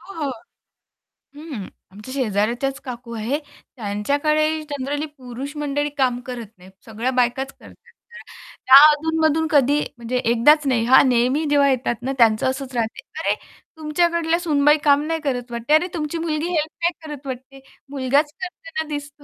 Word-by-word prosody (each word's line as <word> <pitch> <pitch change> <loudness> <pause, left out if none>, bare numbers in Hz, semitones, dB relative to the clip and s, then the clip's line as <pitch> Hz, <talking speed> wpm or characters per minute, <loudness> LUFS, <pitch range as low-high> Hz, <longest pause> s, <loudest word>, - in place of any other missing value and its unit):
हो, 345 -5 -7
हो, 280 - -1 1.1
हं. 290 - -7 0.2
आमच्या 210 +6 -10
शेजाऱ्याच्याच 240 +2 -1
काकू 240 -2 -7
आहे 235 +7 -2 0.4
त्यांच्याकडे 285 +9 0
जनरली 285 +1 -3
पुरुष 260 +3 -7
मंडळी 290 0 -1
काम 255 -3 +1
करत 245 -3 -6
नाहीत 185 +1 -16
सगळ्या 225 +3 -3
बायकाच 255 +2 0
करतात - - -15
तर, 470 0 -17 0.5
त्या 260 +1 +9
अधूनमधून 320 +1 +1
कधी 290 0 +4 0.2
म्हणजे 240 +2 -3
एकदाच 250 +6 +4
नाही 235 -3 +1
हा, 255 +2 +7
नेहमी 255 +4 +2
जेव्हा 285 -1 +4
येतात 255 -2 0
ना 260 +2 -2
त्यांचं 225 -2 +4
असंच 265 0 -5
राहते, 230 - -2 0.2
"अरे! - - +1 0.4
तुमच्याकडल्या 335 +2 +1
सुनबाई 295 -3 +3
काम 285 -1 +4
नाही 325 0 -1
करत 245 -4 -3
वाटते? 235 +5 -1
अरे 315 +4 +4
तुमची 315 -1 -3
मुलगी 320 -1 -2
हेल्प 315 -2 -1
नाही 345 - +3 0.2
करत 290 -2 -8
वाटते. 265 +1 -8 0.3
मुलगाच 280 +2 +1
करताना" 330 -3 -5
"दिसतो." 290 0 -7
280 Hz, 155 wpm, -21 LUFS, 245-305 Hz, 1.1 s, त्या